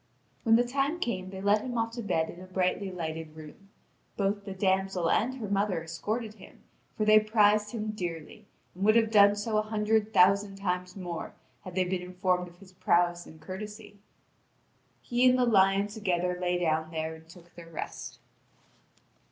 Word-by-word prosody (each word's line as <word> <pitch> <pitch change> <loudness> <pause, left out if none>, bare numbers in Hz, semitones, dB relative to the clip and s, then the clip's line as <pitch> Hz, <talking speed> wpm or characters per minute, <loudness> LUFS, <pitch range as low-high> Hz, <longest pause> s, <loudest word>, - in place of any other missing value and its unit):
When 225 -2 +4
the 240 - +4
time 275 +6 -1
came 185 - -3
they 190 0 -8
led 205 +1 +3
him 245 0 -4
off 225 0 0
to 235 +1 -6
bed 165 -6 -1
in 175 - -12
a 185 - -10
brightly 185 +1 -1
lighted 160 -3 -5
room; 160 +6 -13 0.5
both 200 0 -1
the 195 - -5
damsel 190 -2 +1
and 255 +4 +1
her 230 -5 -5
mother 200 -4 0
escorted 215 +7 -4
him, - - -16 0.3
for 215 - 0
they 215 0 +7
prized 210 -1 +3
him 215 -1 -3
dearly, 175 -6 -6 0.3
and 185 - -6
would 215 +2 +5
have 225 -1 +3
done 205 -1 +6
so 215 +1 -1
a - - +3
hundred 215 0 0
thousand 195 +2 +4
times 180 -2 -3
more 175 -4 -6 0.3
had 185 -1 -9
they 185 - +3
been 180 0 -2
informed 180 0 -1
of 175 0 -16
his 185 0 -16
prowess 175 -1 +1
and 160 0 -14
courtesy. 210 +3 -8 1.0
He 250 +1 +3
and 250 - +3
the 250 - +3
lion 195 -3 +4
together 180 -4 -1
lay 180 0 +1
down 160 -2 0
there 160 0 -3
and 160 0 -15
took 175 0 -16
their 170 -1 -12
rest. 165 - -7
195 Hz, 185 wpm, -29 LUFS, 180-215 Hz, 1.0 s, they